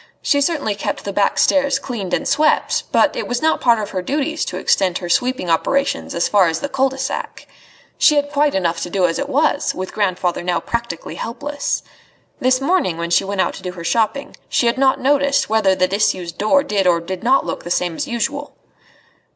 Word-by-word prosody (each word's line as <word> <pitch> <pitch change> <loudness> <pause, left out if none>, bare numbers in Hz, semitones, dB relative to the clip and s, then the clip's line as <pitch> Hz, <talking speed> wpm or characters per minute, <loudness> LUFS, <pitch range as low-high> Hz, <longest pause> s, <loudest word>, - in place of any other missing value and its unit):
She 285 -2 +2
certainly 285 -8 0
kept 200 - -4
the 200 - -4
back 200 +1 +1
stairs 280 -1 +3
cleaned 225 -10 -5
and - - -1
swept, 305 +2 +1
but - - +3
it - - -3
was 245 0 -1
not 320 +3 +1
part 235 -2 +4
of 210 -2 -4
her 185 - -2
duties 300 - -2
to - - -5
extend 185 -2 +1
her 175 - -6
sweeping 250 0 0
operations 275 +12 0
as 170 - +1
far 200 -4 +4
as 160 - -1
the 285 - -4
cul 270 0 +1
de 265 - -9
sac. 270 0 -4 0.5
She 300 - +5
had 290 0 0
quite 290 0 +2
enough 170 -3 0
to - - -3
do 185 0 +1
as 165 -1 -1
it 280 - -3
was, 290 +1 +1
with 185 0 -5
grandfather 185 -4 -1
now 175 0 0
practically 235 -8 -4
helpless. 285 +5 -3 0.6
This 255 0 +2
morning, 275 - +1
when 170 0 -4
she 170 - +4
went 195 0 -1
out - - 0
to - - -10
do 180 -1 -5
her 170 -2 -9
shopping, 230 +9 -1
she - - +1
had 235 +2 +1
not 265 -1 +3
noticed 280 -1 +2
whether 205 -4 +3
the 185 0 +2
disused 185 -4 -1
door 280 +7 +3
did 200 -3 0
or 170 -1 +4
did 180 +3 -6
not 265 +3 +3
look - - -4
the - - -7
same 175 -1 0
as - - -3
usual. 270 +5 -3
230 Hz, 215 wpm, -19 LUFS, 185-280 Hz, 0.6 s, She